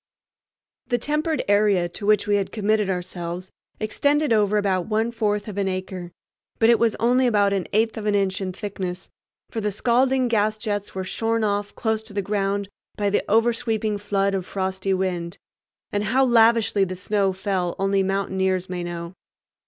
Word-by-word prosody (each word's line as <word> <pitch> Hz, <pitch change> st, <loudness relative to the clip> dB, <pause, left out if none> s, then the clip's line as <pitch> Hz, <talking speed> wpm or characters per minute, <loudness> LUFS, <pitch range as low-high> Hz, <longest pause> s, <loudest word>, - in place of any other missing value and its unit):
The 245 Hz, -, +1 dB
tempered 300 Hz, +5 st, -1 dB
area 205 Hz, -3 st, +3 dB
to 200 Hz, +4 st, -6 dB
which 215 Hz, 0 st, +4 dB
we 205 Hz, 0 st, +2 dB
had 195 Hz, -2 st, -2 dB
committed 215 Hz, -1 st, +1 dB
ourselves 180 Hz, 0 st, -4 dB, 0.3 s
extended 285 Hz, +5 st, +1 dB
over 210 Hz, -1 st, +3 dB
about 190 Hz, -3 st, 0 dB
one 220 Hz, +2 st, 0 dB
fourth 210 Hz, -2 st, -1 dB
of 205 Hz, -1 st, -4 dB
an 195 Hz, -, 0 dB
acre; 185 Hz, -1 st, -4 dB, 0.5 s
but 225 Hz, +1 st, +5 dB
it 235 Hz, -, +4 dB
was 230 Hz, -2 st, +2 dB
only 250 Hz, +2 st, +3 dB
about 205 Hz, -3 st, +3 dB
an 195 Hz, -3 st, -1 dB
eighth 220 Hz, +2 st, +1 dB
of 210 Hz, -, -4 dB
an 205 Hz, -, +2 dB
inch 195 Hz, -1 st, 0 dB
in 185 Hz, -1 st, -2 dB
thickness, 185 Hz, -2 st, -5 dB, 0.4 s
for 225 Hz, -, -3 dB
the 210 Hz, -, 0 dB
scalding 255 Hz, +5 st, +2 dB
gas 215 Hz, -2 st, +1 dB
jets 205 Hz, -2 st, -4 dB
were 190 Hz, -, -2 dB
shorn 225 Hz, +4 st, -1 dB
off 205 Hz, -1 st, -1 dB
close 220 Hz, -1 st, 0 dB
to 220 Hz, -1 st, -11 dB
the 200 Hz, -1 st, -1 dB
ground 200 Hz, 0 st, -1 dB, 0.3 s
by 205 Hz, -1 st, 0 dB
the -, -, +1 dB
oversweeping 225 Hz, -1 st, +1 dB
flood 200 Hz, -1 st, 0 dB
of 190 Hz, -1 st, -1 dB
frosty 190 Hz, 0 st, -2 dB
wind. 180 Hz, -1 st, -2 dB, 0.5 s
And 205 Hz, 0 st, -1 dB
how 260 Hz, +6 st, +3 dB
lavishly 230 Hz, -4 st, +4 dB
the 185 Hz, -1 st, -2 dB
snow 195 Hz, +1 st, 0 dB
fell 185 Hz, -2 st, -2 dB
only 195 Hz, 0 st, +1 dB
mountaineers 190 Hz, -1 st, 0 dB
may 180 Hz, -1 st, -3 dB
know. 170 Hz, 0 st, -6 dB
205 Hz, 175 wpm, -23 LUFS, 190-220 Hz, 0.5 s, but